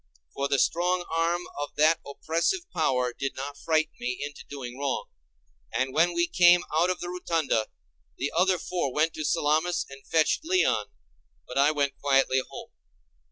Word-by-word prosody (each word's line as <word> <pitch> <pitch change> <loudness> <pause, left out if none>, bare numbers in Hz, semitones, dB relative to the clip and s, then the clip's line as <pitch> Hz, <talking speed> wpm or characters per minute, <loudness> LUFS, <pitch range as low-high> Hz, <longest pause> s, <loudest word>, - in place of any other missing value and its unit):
For 140 - -1
the 140 - +1
strong 175 +5 +1
arm 170 +2 +1 0.2
of 145 0 -5
that 155 +2 +4
oppressive 165 - -1
power 125 -2 +1
did 135 +2 -4
not 140 +2 -5
frighten 155 0 +1
me 125 +1 -3
into 145 0 -9
doing 130 -3 -7
wrong; 140 -2 -2 0.6
and 130 0 -1
when 170 +3 +3
we 170 0 +3
came 175 0 +5
out 165 +3 +3
of 185 - -1
the 175 - -4
rotunda 165 -10 0 0.5
the 140 - -2
other 185 +2 +3
four 175 -4 -2
went 155 +4 +1
to 155 - -5
Salamis 160 +4 +1
and 135 0 -11
fetched 160 - +2
Leon, 335 - +2 0.6
but 125 - -2
I 140 +2 +5
went 145 -2 -1
quietly 135 -2 +3
home. - - -10
155 Hz, 165 wpm, -27 LUFS, 135-175 Hz, 0.6 s, came